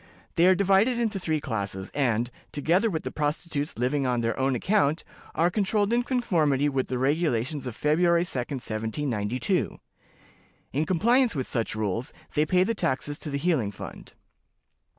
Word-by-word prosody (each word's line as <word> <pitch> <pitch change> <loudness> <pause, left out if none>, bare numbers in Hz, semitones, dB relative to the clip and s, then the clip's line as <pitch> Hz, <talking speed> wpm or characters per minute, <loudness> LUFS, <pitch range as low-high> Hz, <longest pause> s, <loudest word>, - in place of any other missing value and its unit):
They 170 +2 +5
are 185 - +6
divided 200 +6 +3
into 225 -4 -1
three 160 -4 0
classes, 100 -7 -4
and, 120 -4 +1 0.2
together 175 +9 +2
with 160 -5 -3
the - - -4
prostitutes 150 0 -2
living 130 +3 0
on 125 -1 +1
their 115 0 0
own 135 0 +2
account, 160 - +1 0.3
are 170 +2 +3
controlled 205 +2 +1
in 240 - +3
conformity 165 - +1
with 135 -2 -1
the 125 - -2
regulations 140 -1 0
of 120 - -5
February 170 +4 +3
2d, 175 - -7
1792. 120 -2 -2 1.0
In 150 +4 +1
compliance 235 +5 +3
with 130 -3 -1
such 115 -3 -2
rules, 110 +4 -2 0.2
they 150 +1 +2
pay 180 +2 +4
the 230 - 0
taxes 145 -6 -2
to 155 - -4
the 140 - -2
healing 145 - +1
fund. 100 - -10
145 Hz, 160 wpm, -26 LUFS, 125-180 Hz, 1.0 s, are